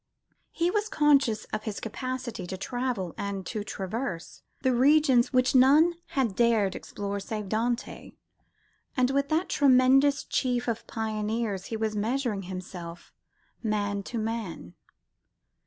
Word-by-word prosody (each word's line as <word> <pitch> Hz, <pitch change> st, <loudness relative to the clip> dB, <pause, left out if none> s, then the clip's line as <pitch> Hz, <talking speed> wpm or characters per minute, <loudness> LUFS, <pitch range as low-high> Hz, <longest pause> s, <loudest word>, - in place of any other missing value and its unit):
He 340 Hz, +1 st, 0 dB
was 420 Hz, +1 st, 0 dB
conscious 280 Hz, -, +3 dB
of 215 Hz, 0 st, -3 dB
his 215 Hz, -3 st, -4 dB
capacity 245 Hz, -4 st, -5 dB
to 190 Hz, -, -5 dB
travel 245 Hz, -5 st, -3 dB
and 200 Hz, -2 st, -3 dB
to 210 Hz, +3 st, -4 dB
traverse 195 Hz, -2 st, -5 dB, 0.2 s
the 260 Hz, -1 st, +3 dB
regions 265 Hz, -1 st, +4 dB
which 255 Hz, 0 st, +3 dB
none 285 Hz, +6 st, +6 dB, 0.2 s
had 235 Hz, -8 st, +1 dB
dared 225 Hz, -4 st, +2 dB
explore 200 Hz, 0 st, -5 dB
save 210 Hz, +1 st, -5 dB
Dante. 235 Hz, +3 st, -2 dB, 0.8 s
And 255 Hz, +1 st, +3 dB
with 280 Hz, +1 st, 0 dB
that 320 Hz, +4 st, +1 dB
tremendous 270 Hz, +1 st, +4 dB
chief 245 Hz, -2 st, -1 dB
of 230 Hz, -1 st, -3 dB
pioneers 215 Hz, -2 st, -2 dB
he 225 Hz, -, -4 dB
was 220 Hz, -1 st, -1 dB
measuring 225 Hz, 0 st, -1 dB
himself, 180 Hz, -2 st, -8 dB, 0.5 s
man 205 Hz, -2 st, -1 dB
to 240 Hz, -, -4 dB
man. 220 Hz, -, -4 dB
230 Hz, 130 wpm, -27 LUFS, 205-260 Hz, 0.8 s, none